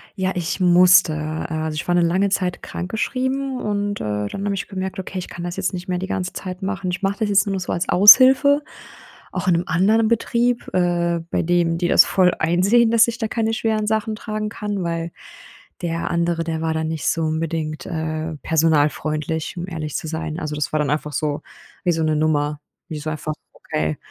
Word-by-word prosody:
Ja, 190 Hz, -1 st, -1 dB
ich 175 Hz, +1 st, -2 dB
musste. 180 Hz, -2 st, +6 dB, 0.4 s
Also, 155 Hz, -1 st, -3 dB
ich 155 Hz, -, -4 dB
war 175 Hz, -, +2 dB
'ne 175 Hz, -, +4 dB
lange 185 Hz, +4 st, +2 dB
Zeit 185 Hz, -2 st, -1 dB
krankgeschrieben 260 Hz, +7 st, -3 dB
und, 205 Hz, -1 st, -2 dB
äh, 105 Hz, -1 st, -2 dB
dann 195 Hz, -, -5 dB
habe 200 Hz, -, 0 dB
ich 180 Hz, -, -4 dB
gemerkt: 190 Hz, -1 st, -5 dB
„Okay, 190 Hz, 0 st, -5 dB
ich 180 Hz, -, -6 dB
kann 175 Hz, -, -7 dB
das 175 Hz, 0 st, -4 dB
jetzt 195 Hz, 0 st, -1 dB
nicht 180 Hz, 0 st, -6 dB
mehr 180 Hz, -, -1 dB
die 190 Hz, -, -4 dB
ganze 185 Hz, -2 st, -3 dB
Zeit 185 Hz, 0 st, -6 dB
machen.“ 190 Hz, -2 st, -3 dB
Ich 180 Hz, -, -4 dB
mache 200 Hz, +2 st, -1 dB
das 215 Hz, -2 st, 0 dB
jetzt 200 Hz, -1 st, +4 dB
nur 200 Hz, -, -2 dB
noch 190 Hz, -, -1 dB
so 180 Hz, -, -4 dB
als 170 Hz, -, -2 dB
Aushilfe, 265 Hz, +8 st, +7 dB, 0.7 s
auch 185 Hz, 0 st, -4 dB
in 180 Hz, -, +5 dB
'nem 170 Hz, -, +1 dB
anderen 210 Hz, +7 st, +3 dB
Betrieb, 235 Hz, +1 st, 0 dB
äh, 175 Hz, -1 st, +1 dB
bei -, -, 0 dB
dem 170 Hz, -1 st, +1 dB
die 175 Hz, 0 st, 0 dB
das -, -, +6 dB
voll 185 Hz, -2 st, +3 dB
einsehen, 195 Hz, +8 st, +3 dB
dass 230 Hz, 0 st, +5 dB
ich 235 Hz, 0 st, -3 dB
da 220 Hz, -, -2 dB
keine 225 Hz, 0 st, -1 dB
schweren 220 Hz, -1 st, -1 dB
Sachen 220 Hz, 0 st, 0 dB
tragen 215 Hz, -1 st, -4 dB
kann. 205 Hz, -3 st, -4 dB
Weil 165 Hz, 0 st, -3 dB, 0.7 s
der 170 Hz, -1 st, -2 dB
andere, 170 Hz, -1 st, 0 dB
der 160 Hz, -1 st, -3 dB
war 160 Hz, 0 st, 0 dB
dann 160 Hz, 0 st, -2 dB
nicht 155 Hz, -4 st, -3 dB
so 165 Hz, -, +1 dB
unbedingt, 155 Hz, -2 st, -2 dB
äh, 160 Hz, 0 st, -3 dB
personalfreundlich, 155 Hz, 0 st, 0 dB
um 175 Hz, +1 st, -4 dB
ehrlich 155 Hz, -4 st, -5 dB
zu -, -, -3 dB
sein. 160 Hz, +1 st, -4 dB
Also, 150 Hz, -2 st, -4 dB
das 150 Hz, -, -2 dB
war 155 Hz, -, +1 dB
dann 145 Hz, -2 st, 0 dB
einfach 150 Hz, 0 st, -2 dB
so 145 Hz, +2 st, -2 dB, 0.4 s
wie 180 Hz, -, +2 dB
so 165 Hz, -1 st, 0 dB
'ne 155 Hz, -1 st, +1 dB
Nummer. 150 Hz, -1 st, 0 dB, 0.3 s
Wie 155 Hz, -1 st, -5 dB
so 155 Hz, +1 st, -4 dB
einfach: 155 Hz, 0 st, -4 dB, 0.2 s
„Okay, 75 Hz, 0 st, -3 dB
175 Hz, 210 wpm, -21 LUFS, 160-200 Hz, 0.7 s, Aushilfe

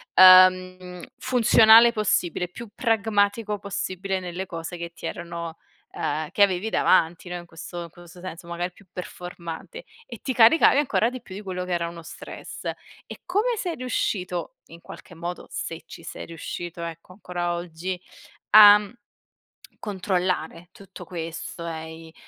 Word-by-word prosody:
uhm, 185 Hz, -1 st, +6 dB
funzionale 230 Hz, -1 st, +6 dB
possibile, 180 Hz, -5 st, 0 dB
più 235 Hz, +4 st, -10 dB
pragmatico 210 Hz, -2 st, +1 dB
possibile, 190 Hz, -1 st, -3 dB
nelle 180 Hz, +1 st, -5 dB
cose 165 Hz, 0 st, -6 dB
che 170 Hz, 0 st, -7 dB
ti -, -, -7 dB
erano, 170 Hz, -2 st, -6 dB, 0.3 s
uhm, 155 Hz, 0 st, -3 dB
che -, -, -1 dB
avevi 190 Hz, +2 st, +1 dB
davanti, 175 Hz, -4 st, +2 dB
no, 180 Hz, -, -4 dB
in 175 Hz, -, -10 dB
questo 170 Hz, +1 st, -8 dB
in 170 Hz, -, -10 dB
questo 175 Hz, +1 st, -15 dB
senso, 170 Hz, -2 st, -8 dB
magari 175 Hz, +1 st, -3 dB
più 200 Hz, -, -21 dB
performante 180 Hz, -, -8 dB, 0.2 s
e 235 Hz, -4 st, -9 dB
ti 265 Hz, -, -3 dB
caricavi 245 Hz, +5 st, +6 dB
ancora 255 Hz, -5 st, +2 dB
di 255 Hz, -1 st, -8 dB
più 190 Hz, -, -11 dB
di 205 Hz, -, -7 dB
quello 180 Hz, -2 st, -5 dB
che 180 Hz, -, -3 dB
era 170 Hz, -1 st, -1 dB
uno 170 Hz, 0 st, -10 dB
stress. -, -, -10 dB, 0.4 s
E -, -, -10 dB
come 430 Hz, +6 st, 0 dB
sei 350 Hz, -4 st, -3 dB
riuscito 185 Hz, -8 st, -3 dB
in 165 Hz, +1 st, -13 dB
qualche 175 Hz, -, -12 dB
modo, 175 Hz, +2 st, -6 dB
se 165 Hz, 0 st, -6 dB
ci -, -, -12 dB
sei -, -, -8 dB
riuscito 170 Hz, +1 st, -7 dB
ecco, 165 Hz, +1 st, -8 dB
ancora 175 Hz, -3 st, -3 dB
oggi, 175 Hz, +1 st, -5 dB, 0.5 s
a 210 Hz, -1 st, +10 dB, 1.0 s
controllare 185 Hz, -3 st, -2 dB
tutto 195 Hz, -1 st, -12 dB
questo 170 Hz, -1 st, -6 dB
e 160 Hz, -1 st, -6 dB
i 160 Hz, -, -16 dB
180 Hz, 150 wpm, -24 LUFS, 170-205 Hz, 1.0 s, a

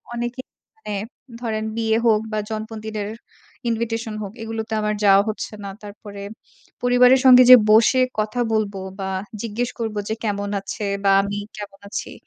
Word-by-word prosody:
অনেকেই 240 Hz, +2 st, -4 dB, 0.3 s
মানে 435 Hz, -, -7 dB, 0.5 s
ধরেন 220 Hz, -2 st, -2 dB
বিয়ে 225 Hz, -1 st, +1 dB
হোক 215 Hz, -2 st, +4 dB
বা 215 Hz, -, 0 dB
জন্মদিনের 215 Hz, -1 st, -5 dB, 0.6 s
invitation 225 Hz, 0 st, -2 dB
হোক 195 Hz, -, -6 dB
এগুলোতে 225 Hz, 0 st, -4 dB
আমার 210 Hz, 0 st, 0 dB
যাওয়া 195 Hz, 0 st, +6 dB
হচ্ছে 215 Hz, -, -5 dB
না। 200 Hz, -, -5 dB
তারপরে, 205 Hz, 0 st, -10 dB, 0.6 s
পরিবারের 245 Hz, +1 st, +5 dB
সঙ্গে 255 Hz, -1 st, +9 dB
যে 255 Hz, -, +14 dB, 0.2 s
বসে 225 Hz, +4 st, +5 dB, 0.2 s
কথা 215 Hz, +3 st, -1 dB
বলব 215 Hz, -2 st, 0 dB, 0.3 s
বা 190 Hz, -, -3 dB, 0.3 s
জিজ্ঞেস 235 Hz, +2 st, -2 dB
করব 225 Hz, -2 st, -3 dB
যে 220 Hz, -, -1 dB
কেমন 205 Hz, -2 st, -2 dB
আছে? 200 Hz, +2 st, -5 dB, 0.2 s
বা 195 Hz, -, +4 dB
আমি 200 Hz, +1 st, -4 dB, 0.2 s
কেমন 205 Hz, -1 st, -9 dB
আছি? -, -, -5 dB
220 Hz, 150 wpm, -22 LUFS, 205-230 Hz, 0.6 s, যে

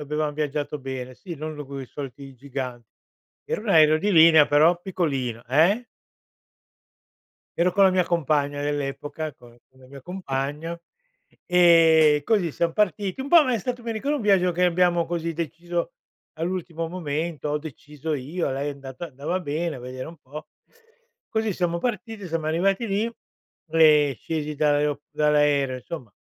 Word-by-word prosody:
avevam 150 Hz, 0 st, -2 dB
viaggiato 150 Hz, 0 st, -2 dB
bene. 130 Hz, -1 st, -6 dB
Sì, 175 Hz, +3 st, -8 dB
non 155 Hz, 0 st, -6 dB
coi 135 Hz, -1 st, -7 dB
soliti 135 Hz, 0 st, -9 dB
giganti. 125 Hz, -3 st, -6 dB, 0.6 s
Era -, -, -3 dB
un 230 Hz, -, -7 dB
aereo 155 Hz, -2 st, +6 dB
di 205 Hz, +5 st, 0 dB
linea, 160 Hz, -2 st, +7 dB
però 160 Hz, +4 st, +4 dB
piccolino. 135 Hz, -11 st, -2 dB
Eh? 175 Hz, -, +3 dB, 1.7 s
Ero 175 Hz, +2 st, +2 dB
con 200 Hz, +1 st, +5 dB
la 190 Hz, -, +6 dB
mia 185 Hz, -1 st, +2 dB
compagna 145 Hz, -4 st, 0 dB
dell'epoca, 145 Hz, +2 st, -3 dB
con 120 Hz, -2 st, -18 dB
con 130 Hz, -, -26 dB
la 130 Hz, -, -16 dB
mia 140 Hz, +1 st, -12 dB
compagna 155 Hz, -2 st, -4 dB, 0.7 s
e 165 Hz, -4 st, +5 dB
così 200 Hz, -7 st, +1 dB
siam 170 Hz, -1 st, 0 dB
partiti. 205 Hz, -, 0 dB
Un 270 Hz, -, -4 dB
po' 310 Hz, -4 st, +6 dB
è 240 Hz, -, +1 dB
stato, 245 Hz, +4 st, -4 dB
mi 230 Hz, -, -2 dB
ricordo, 275 Hz, +7 st, -1 dB
un 275 Hz, -, -4 dB
viaggio 195 Hz, -3 st, +3 dB
che 180 Hz, +2 st, +1 dB
abbiamo, 175 Hz, -1 st, +2 dB
così, 170 Hz, -1 st, -2 dB
deciso 170 Hz, +1 st, -4 dB, 0.4 s
all'ultimo 165 Hz, -1 st, -3 dB
momento, 160 Hz, -2 st, -3 dB
ho 150 Hz, -, 0 dB
deciso 150 Hz, 0 st, -7 dB
io, 145 Hz, +5 st, -3 dB
a -, -, -2 dB
lei 140 Hz, +2 st, -2 dB
è -, -, -4 dB
andata 135 Hz, +4 st, -8 dB
andava 150 Hz, +5 st, -3 dB
bene, 155 Hz, 0 st, -3 dB
a -, -, -9 dB
vedere 130 Hz, +1 st, -7 dB
un 165 Hz, -, -11 dB
po'. 150 Hz, +3 st, -10 dB, 0.8 s
Così, 220 Hz, -2 st, -1 dB
siamo 170 Hz, -2 st, -1 dB
partiti, 225 Hz, -2 st, -4 dB
siamo 160 Hz, -1 st, -2 dB
arrivati 195 Hz, +8 st, +1 dB
lì, 215 Hz, +4 st, -1 dB, 0.6 s
e 150 Hz, -4 st, +5 dB
scesi 150 Hz, -2 st, -4 dB
dall'ae 145 Hz, -1 st, +2 dB
dall'aereo, 145 Hz, -3 st, +2 dB
insomma, 125 Hz, -, -8 dB
155 Hz, 160 wpm, -24 LUFS, 145-175 Hz, 1.7 s, linea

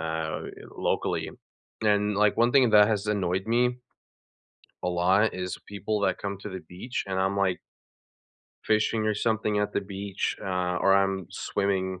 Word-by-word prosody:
uh, 80 Hz, -1 st, -3 dB
eh, -, -, -6 dB, 0.3 s
locally. -, -, -1 dB, 0.5 s
And, 105 Hz, -1 st, +2 dB
like, 105 Hz, 0 st, +3 dB
one 120 Hz, +1 st, +3 dB
thing 130 Hz, -4 st, +5 dB
that 105 Hz, 0 st, +7 dB
has 105 Hz, -1 st, 0 dB
annoyed 95 Hz, -1 st, 0 dB
me 125 Hz, +2 st, +1 dB, 1.0 s
a 90 Hz, -, +1 dB
lot, 95 Hz, +5 st, +2 dB
is 90 Hz, 0 st, -4 dB
people 105 Hz, +1 st, -2 dB
that 100 Hz, -, +1 dB
come 100 Hz, -1 st, -4 dB
to 100 Hz, -, -7 dB
the 95 Hz, -2 st, -6 dB
beach 90 Hz, +10 st, -5 dB
and 95 Hz, -, -1 dB
I'm 95 Hz, +1 st, +1 dB
like 95 Hz, -2 st, +1 dB, 1.1 s
fishing 110 Hz, 0 st, +1 dB
or 110 Hz, -, +1 dB
something 110 Hz, -1 st, 0 dB
at 105 Hz, 0 st, 0 dB
the -, -, 0 dB
beach, 100 Hz, 0 st, -3 dB
uh, 90 Hz, -1 st, -1 dB
or 95 Hz, 0 st, +5 dB
I'm 95 Hz, -2 st, +1 dB
swimming 95 Hz, -2 st, -1 dB
100 Hz, 165 wpm, -27 LUFS, 95-105 Hz, 1.1 s, that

